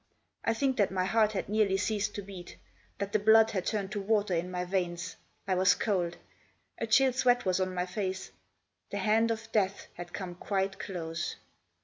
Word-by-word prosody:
I 225 - +1
think 265 +1 +1
that 205 - +3
my 185 -1 0
heart 215 +2 +3
had 195 - -2
nearly 205 -2 +2
ceased 205 +1 -1
to 205 - -4
beat; 190 -2 -10 0.4
that 200 0 -3
the 215 - +4
blood 220 +1 +6
had 190 -4 -2
turned 200 -3 -1
to 210 -1 -2
water 205 -1 +1
in 170 +1 -1
my 180 0 -3
veins. 175 -2 -2 0.3
I 190 - +2
was 185 0 +4
cold; 180 -5 -1 0.6
a - - -2
chill 265 -2 +5
sweat 245 -1 +3
was 185 0 +2
on 185 0 -1
my 180 0 0
face. 190 0 -4 0.6
The - - -4
hand 225 +1 +3
of 225 0 -3
death 200 -3 +1
had 175 0 -8
come 185 -1 -5
quite 190 +1 -2
close. 165 -4 -4
195 Hz, 195 wpm, -30 LUFS, 185-215 Hz, 0.6 s, blood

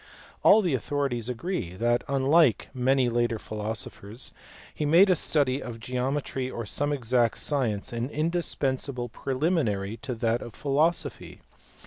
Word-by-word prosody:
All 220 - +6
the 175 -6 +1
authorities 130 -2 -1
agree 125 - -3
that, 120 +4 +1
unlike 140 - +3
many 130 0 +2
later 120 -1 +1
philosophers, 110 +1 -6 0.4
he - - -3
made 170 +6 +6
a - - +5
study 140 -4 +1
of 115 -2 -7
geometry 130 +2 -2
or 120 -3 -5
some 145 +7 -1
exact 120 -4 +1
science 120 -8 -1
an 120 +2 -2
indispensable 140 -6 -1
preliminary 130 - -1
to 125 - -5
that 115 +1 0
of 120 - -9
philosophy. 150 +4 -1
130 Hz, 130 wpm, -27 LUFS, 115-145 Hz, 0.4 s, All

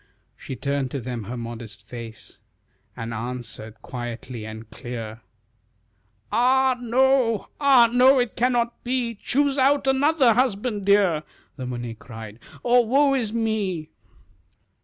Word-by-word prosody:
She 130 - -7
turned 140 -1 -2
to 140 - -4
them 120 -3 -5
her 125 +5 -5
modest 115 -3 -8
face, 115 -2 -10 0.6
And 115 -1 -5
answered 115 -1 -7
quietly 120 -2 -6
and 110 0 -9
clear. 115 -3 -7 1.1
"Ah, 260 +2 +3
no! 245 -2 +2
ah, 270 -5 +6
no! 260 +2 +6
It 245 -2 0
cannot 240 -1 0
be 245 -1 -1
Choose 275 +6 0
out 275 +1 +3
another 270 -1 +4
husband, 215 -3 0
dear," 195 -6 +4 0.3
The 130 -3 -6
Muni 120 -2 -4
cried, 110 -1 -10 0.2
"or 245 0 +5
woe 275 +4 +3
is 235 -6 0
me!" 215 -8 -2
205 Hz, 125 wpm, -24 LUFS, -, 1.1 s, ah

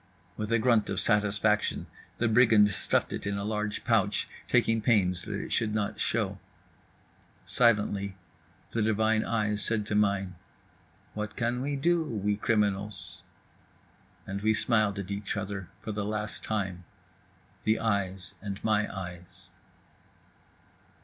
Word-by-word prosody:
With 105 +1 -4
a 115 - +4
grunt 115 -2 +3
of 95 - -1
satisfaction 105 0 +1 0.3
the 120 - +2
brigand 110 -2 +6
stuffed - - +1
it - - -4
in 100 0 -1
a 100 - -3
large 105 0 -2
pouch, 105 -4 +2 0.2
taking 115 0 +3
pains 95 -6 +2
that - - -3
it - - -6
should 110 -1 +1
not 105 -2 -1
show. 100 -4 0 1.1
Silently 105 -4 +2 0.6
the 115 - 0
divine 110 +1 +2
eyes 105 -2 0
said 110 -2 0
to 105 - -3
mine: 100 -3 +1 0.8
"What 105 0 -4
can 120 +1 -1
we 140 +2 -1
do, 170 +4 +2
we 105 -8 -1
criminals?" 105 -1 -1 1.0
And 100 0 -4
we 110 +1 +3
smiled 110 -3 +2
at 100 0 -5
each 100 +1 -3
other 95 -3 -4
for 110 - -4
the 105 0 -2
last 105 +1 -3
time, 95 -4 -2 0.8
the 110 +1 +3
eyes 95 -4 -1
and 100 -1 -5
my 105 -1 +1
eyes. 90 -2 -9
105 Hz, 135 wpm, -29 LUFS, 100-110 Hz, 1.1 s, brigand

